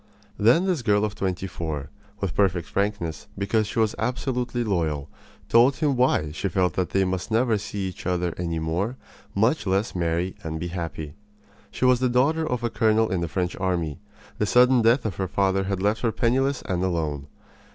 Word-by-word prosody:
Then 120 - +5
this 180 -7 0
girl 105 -2 +2
of 105 - -3
twenty 95 -2 -2
four, 80 -6 -5 0.3
with 100 -3 -1
perfect 90 -4 +1
frankness, 100 -6 -2
because 105 +2 +1
she 105 - -6
was 110 -2 +2
absolutely 125 -1 -1
loyal, 80 -9 -1 0.4
told 120 +4 +5
him 150 -4 +1
why 125 - +2
she 95 +5 -2
felt 90 -2 +1
that 90 -1 -1
they 95 +5 +2
must 95 +2 -2
never 115 +1 +2
see 100 -2 -4
each 90 - -8
other 90 -1 0
any 85 -2 -3
more 85 +10 -2 0.4
much 110 +4 +2
less 95 +3 +1
marry 85 +1 -1
and 80 -1 -4
be 85 - -4
happy. 80 -4 -5 0.6
She - - -2
was 125 -1 +5
the 130 -1 +2
daughter 155 +6 +2
of 125 -1 -2
a 120 - +1
colonel 110 -1 +2
in 90 -2 0
the 85 - -1
French 90 0 -2
army. 90 -5 -1 0.4
The 105 - +1
sudden 125 +2 +5
death 115 +2 +3
of 100 -6 -3
her 95 - -1
father 95 +1 +1
had 95 -1 -2
left 105 +2 +1
her 115 - +1
penniless 130 +4 +1
and 90 -1 -1
alone. 80 -6 -2
100 Hz, 195 wpm, -25 LUFS, 85-120 Hz, 0.6 s, Then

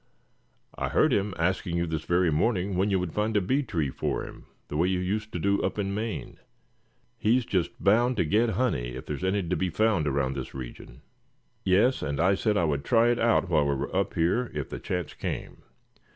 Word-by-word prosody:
I - - -3
heard - - +3
him 100 -1 0
asking 85 0 0
you 85 - +1
this 80 -2 -3
very 85 -1 +2
morning 95 +3 +1
when 95 +3 +2
you 95 -2 +2
would 90 -3 -3
find 105 0 0
a - - +5
bee 130 +10 +1
tree 80 - -2
for - - -2
him, - - -12 0.2
the - - -6
way 85 +4 +2
you 95 0 +1
used 105 +4 -2
to - - -2
do 100 +3 +1
up - - -2
in 100 -1 -1
Maine. 110 +2 -4 0.8
He's 120 +3 +2
just 90 -7 0
bound 120 +5 +3
to - - +2
get 110 +9 +2
honey, 65 - 0
if 65 - -7
there's 75 +4 -5
any 95 +1 +1
to 85 +2 -1
be 95 - 0
found 100 -3 +1
around 70 -1 0
this 65 -1 -6
region." - - -9 0.6
"Yes, 105 +8 +3
and 70 0 -2
I 90 +4 +4
said 105 +1 +1
I 85 - +2
would 70 -2 -1
try 115 0 +4
it 120 - +1
out 115 -4 +3
while 75 -4 +2
we 70 - +1
were 65 - -4
up - - 0
here, 90 +10 +1
if - - -3
the - - -5
chance 90 -4 -3
came. - - -5
95 Hz, 220 wpm, -27 LUFS, 80-105 Hz, 0.8 s, a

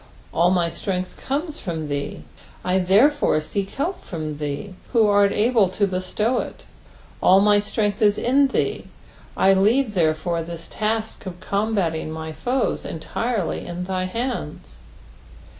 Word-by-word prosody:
All 170 +2 +4
my 180 -2 +2
Strength 185 0 -4
comes 295 +3 -2
from 160 -5 -4
thee, 145 -1 -4 0.4
I 185 +1 +2
therefore 210 - +4
seek 195 +5 -3
help 350 +7 -3
from 155 -3 -5
thee, 150 +6 -4 0.2
who 230 -3 +5
art 205 -1 +4
able 220 -3 +3
to 200 +2 +1
bestow 200 +6 -1
it. - - -6 0.6
All 190 +1 +6
my 205 +1 +5
Btrenglh 205 0 -1
is 205 -1 +4
In 275 +3 +3
thee, 270 - -1 0.5
I 195 - +5
leave 215 +5 +3
therefore 165 -1 +1
this 165 0 -7
task 220 -1 -2
of 180 -1 -7
combating 200 -7 -1
my 160 0 -5
foes 250 +9 -1
entirely 205 +5 -3
in 175 +1 -4
thy 185 0 -2
hands. 185 - -4
195 Hz, 140 wpm, -23 LUFS, 170-220 Hz, 0.6 s, All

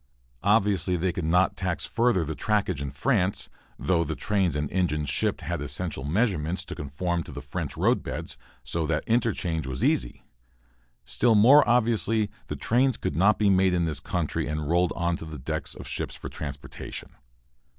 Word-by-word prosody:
Obviously, 100 -4 +2
they 90 +2 0
could 90 -2 -3
not 90 +4 +3
tax 90 -3 -2
further 115 -7 +2
the 80 +1 -4
trackage 100 -7 0
in 70 - -3
France, 95 - 0 0.3
though 85 -2 +1
the 80 0 -3
trains 95 -7 0
and 75 0 -1
engines 75 -6 0
shipped - - +1
had - - -3
essential 75 0 -3
measurements 85 - 0
to - - -6
conform 85 +5 -2
to - - -9
the - - -6
French - - -5
road - - +2
beds, - - -5 0.3
so 80 -2 -2
that 80 -1 0
interchange 100 - 0
was 65 0 -3
easy. - - 0 0.8
Still 115 -2 +3
more 130 +8 +8
obviously, 115 -3 +2 0.2
the - - -4
trains 125 +2 +2
could 70 - -3
not 100 +6 +4
be 105 -2 +3
made 95 -1 +3
in 85 -1 +1
this 80 -3 -2
country 85 -4 -2
and 75 0 -3
rolled 85 +2 +2
onto 85 -1 -1
the 80 -1 -7
decks 80 +4 -4
of - - -9
ships - - -3
for - - -7
transportation. 70 -3 -6
90 Hz, 175 wpm, -26 LUFS, 75-105 Hz, 0.8 s, more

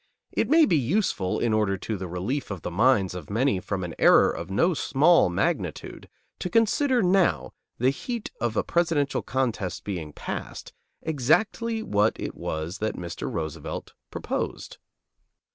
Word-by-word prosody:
It - - 0
may 320 +1 +6
be 180 - +2
useful, 130 - 0
in 115 -2 +1
order 105 -3 +1
to 110 +3 -4
the 95 -1 -5
relief 95 +11 -3
of 100 -5 -6
the - - -4
minds 100 -1 +3
of 90 -5 -8
many 115 -1 +1
from 95 0 -3
an 85 -2 -5
error - - +6
of - - -6
no 170 - +2
small 155 - +4
magnitude, 90 - -2 0.3
to 180 - -3
consider 235 - +2
now, 180 - +2 0.2
the 125 +3 +3
heat 235 - -5
of 115 -2 -1
a - - +2
presidential 165 -5 +1
contest 120 -8 -2
being 85 -7 -5
past, - - -6 0.3
exactly 215 - +1
what 105 - +1
it - - -4
was 80 +4 -4
that 110 +1 -2
Mr. 85 -1 -5
Roosevelt 80 -2 -5 0.2
proposed. - - -4
115 Hz, 155 wpm, -26 LUFS, -, 0.3 s, may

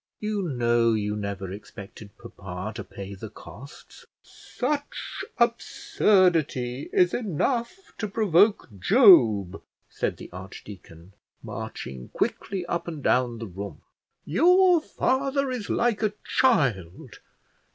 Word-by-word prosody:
You 210 -1 -2
know 120 -3 +2
you 105 -1 -1
never 100 -2 -5
expected 105 +1 -11
papa 95 -3 -7
to 110 -2 -6
pay 100 0 -9
the 105 +3 -8
costs." 140 +8 -14 0.2
"Such 290 -1 -5
absurdity 180 - +1
is 180 -1 +3
enough 240 - -2
to 210 - -2
provoke 205 0 +3
Job," 110 - +5 0.3
said - - -2
the - - -11
archdeacon, 90 -1 -11 0.3
marching 65 -1 -7
quickly 190 -3 -2
up 170 0 -3
and 155 -5 -6
down 125 -2 +1
the 115 - -6
room. 100 +1 -8 0.4
"Your 355 - +4
father 275 -1 -1
is 240 -5 -5
like 235 -3 +1
a 215 -2 0
child. 120 - 0
135 Hz, 110 wpm, -25 LUFS, -, 0.4 s, Job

